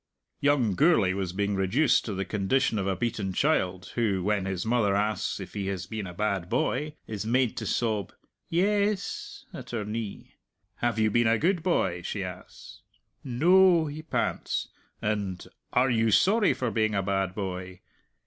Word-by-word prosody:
Young 140 -7 +2
Gourlay 110 - +4
was 95 -2 -2
being 100 +2 -1
reduced 100 +10 +2
to 105 - -3
the 95 0 -2
condition 105 +3 +1
of 95 - -1
a 95 - +1
beaten 105 -5 -2
child, 95 - 0
who, 100 -6 0
when 100 -1 0
his 95 0 -3
mother 110 -4 +2
asks 105 0 -1
if 95 - -8
he 100 -2 -3
has 95 -3 -3
been 110 0 -5
a - - -7
bad 100 -3 -1
boy, 150 0 -1
is 105 -2 -4
made 120 +1 +1
to - - -3
sob 110 -5 -1 0.4
"Yes" 200 +3 0
at - - -8
her 110 -4 -3
knee. 105 -1 -6 0.4
"Have 120 -2 0
you 110 -1 +2
been 120 +1 +3
a 115 0 +4
good 175 - +1
boy?" 120 - 0
she 95 +3 -3
asks 90 -1 -10 0.4
"No," 170 +6 +5
he 150 +1 -6
pants; 160 - -2 0.3
and 100 -4 -2 0.3
"Are 125 +1 +3
you 115 -1 +2
sorry 205 - +4
for 125 -3 -2
being 110 -1 +1
a 95 - +1
bad 95 -1 -1
boy?" 90 -2 -5
110 Hz, 170 wpm, -27 LUFS, 95-130 Hz, 0.4 s, No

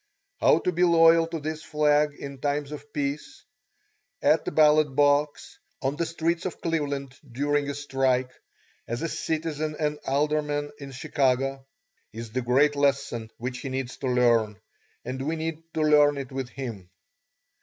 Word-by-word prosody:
How - - +5
to 180 - 0
be 175 +1 +1
loyal 165 -1 +6
to 165 -1 -4
this 155 +1 -4
flag 150 -1 +2
in 140 -2 -8
times 145 +1 -2
of 145 -1 -9
peace; 145 - -4 0.8
at 155 0 +3
the - - -2
ballot 150 -2 +4
box, 145 +1 +1 0.2
on 135 +1 -1
the 165 +1 -1
streets 165 +1 -1
of 180 - -7
Cleveland 140 -5 -2 0.2
during 145 +3 0
a 145 - -3
strike, 135 -3 0 0.6
as 120 +6 -3
a - - 0
citizen 155 -1 -3
and 150 -1 -1
alderman 145 +1 0
in 140 -1 -8
Chicago, 135 -1 0 0.5
is 115 0 -7
the 130 +3 -1
great 135 +5 +3
lesson 140 -5 0
which 125 +1 -5
he 135 - -5
needs 130 -1 -4
to 135 - -4
learn, 115 -4 +2 0.5
and 130 +1 -4
we 155 +4 -1
need 160 0 -4
to 155 - +1
learn 150 -1 +5
it 135 -2 -6
with 130 -2 -4
him. 115 -10 -7
145 Hz, 160 wpm, -26 LUFS, 135-155 Hz, 0.8 s, loyal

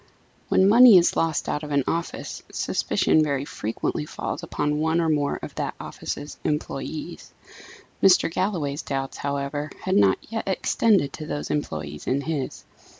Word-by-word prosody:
When 190 - +4
money 235 0 +9
is 175 - +3
lost 165 -2 0
out 150 - -1
of 150 - -7
an 140 -2 +2
office, 170 +1 -3
suspicion 155 - +1
very 140 -2 0
frequently 115 +5 -3
falls 150 - -5
upon 150 -3 -1
one 160 +2 +1
or 165 -1 +1
more 145 -2 +1
of - - -6
that - - -3
office's 145 +1 -6
employés. 150 +2 -4 0.7
Mr. 190 -1 +6
Galloway's 165 -8 -1
doubts, 135 -1 -4
however, 140 +1 -3
had 185 - 0
not 100 -2 +5
yet 225 -2 -3
extended 190 -4 +2
to 155 - -7
those 145 - -4
employed 75 - -4
in 135 +2 +1
his. 145 -3 -4
150 Hz, 150 wpm, -24 LUFS, 140-170 Hz, 0.7 s, money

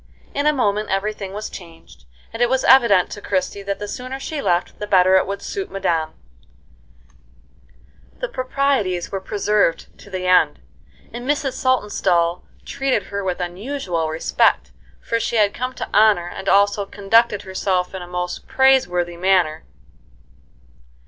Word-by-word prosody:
In 285 +1 0
a - - +6
moment 215 -6 0
every 195 +2 -1
thing 195 -2 -7
was 210 +2 -5
changed; 165 - -13 0.3
and 225 - -5
it 240 - +4
was 260 0 +1
evident 235 -9 +5
to 205 - -7
Christie 195 +1 -2
that 200 0 -3
the 205 - -6
sooner 255 +5 -6
she 295 +1 -4
left 175 -6 -1
the 210 - -4
better 185 -1 +4
it 190 - +3
would 200 0 -5
suit 390 -1 -4
madame. 165 -5 -1 2.0
The - - -3
proprieties 255 - -1
were 195 -1 -3
preserved 205 -2 0
to - - -14
the 185 -1 -4
end, 180 0 +3 0.5
and 245 +3 -6
Mrs. 285 -2 0
Saltonstall 185 -9 +1 0.2
treated 275 -1 -1
her 200 0 -2
with 185 -1 -2
unusual 180 - -3
respect, 160 +1 +1 0.3
for 230 - -1
she 235 - -2
had 210 -2 +3
come 255 +1 -4
to - - -5
honor, 210 -5 +4
and 195 +2 -5
also 200 0 +3
conducted 205 +1 +2
herself 190 -1 -1
in 190 - -6
a 175 - -8
most 180 0 -5
praiseworthy 180 -11 +2
manner. 175 -4 +1
200 Hz, 155 wpm, -20 LUFS, 180-240 Hz, 2.0 s, a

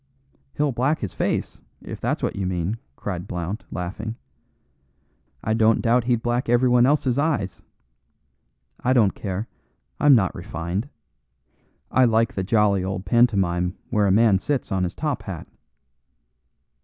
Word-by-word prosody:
"He'll 145 -1 +1
black 130 +6 +1
his 100 - -4
face, - - -2 0.2
if - - -8
that's - - -1
what - - -1
you 95 -2 -2
mean," 90 +4 -2 0.2
cried 90 +1 -5
Blount, 90 +4 -4
laughing. 100 +5 -5 1.3
"I 110 - 0
don't 110 0 +3
doubt 120 0 +2
he'd 120 -2 +1
black 120 0 -1
everyone 120 0 +4
else's 140 -3 +2
eyes. 140 - -1 1.2
I 130 - +3
don't 110 -6 +4
care; 100 +2 -4 0.5
I'm 145 -2 +6
not 95 -6 +2
refined. 85 - -4 1.0
I 130 - +5
like 115 -1 +2
the 95 - -2
jolly 100 -2 +2
old 95 0 -4
pantomime 95 -5 +2
where 105 -3 +2
a - - +3
man 105 -1 +4
sits 140 +4 -2
on 95 -1 +1
his 90 - -5
top 150 -3 -2
hat." 90 -5 -7
110 Hz, 145 wpm, -23 LUFS, 95-120 Hz, 1.3 s, I'm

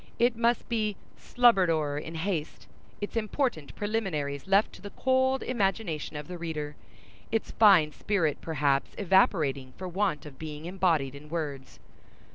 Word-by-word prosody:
It 240 0 +3
must 235 +1 +1
be 215 -3 -1 0.2
"slubber'd 235 -8 +4
o'er 150 -3 0
in 165 +2 -8
haste"—its 180 +4 -5
important 220 - -1
preliminaries 175 -10 -2
left 195 +2 +3
to - - -13
the 205 - -7
cold 260 +3 +1
imagination 195 -9 -1
of 150 0 -6
the 180 -1 -7
reader—its 160 +7 -6
fine 190 -9 +6
spirit 165 -3 -1
perhaps 145 -3 0
evaporating 155 -9 +2
for 185 - -5
want 180 -5 -1
of 140 -3 -11
being 155 0 -7
embodied 170 -7 +1
in 145 +2 -12
words. 145 -5 -5
175 Hz, 135 wpm, -28 LUFS, 150-210 Hz, 0.2 s, fine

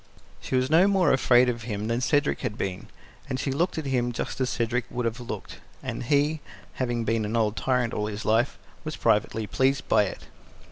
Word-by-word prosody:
She - - -3
was 130 +2 +1
no 170 +5 +6
more 195 -3 +3
afraid 125 -1 +5
of 120 -2 -1
him 105 -3 -4
than 115 +2 0
Cedric 145 +3 +1
had 115 -5 -4
been, 95 -1 -4 0.4
and 130 -1 -2
she 135 - -1
looked 170 +7 0
at 160 - -3
him 125 -3 0
just 120 - -4
as 130 - +1
Cedric 120 0 -1
would 125 0 -3
have 115 +1 -2
looked, 120 - -7 0.3
and - - -4
he, 145 +4 +1 0.4
having 120 -2 0
been 115 0 0
an 105 +2 -2
old 110 -2 +1
tyrant 125 -2 0
all 105 - -1
his 105 +1 -5
life, 115 +4 +2 0.3
was 155 -1 -4
privately 110 0 +1
pleased 130 +5 +1
by 105 - +4
it. 95 - -6
125 Hz, 205 wpm, -26 LUFS, 115-135 Hz, 0.4 s, no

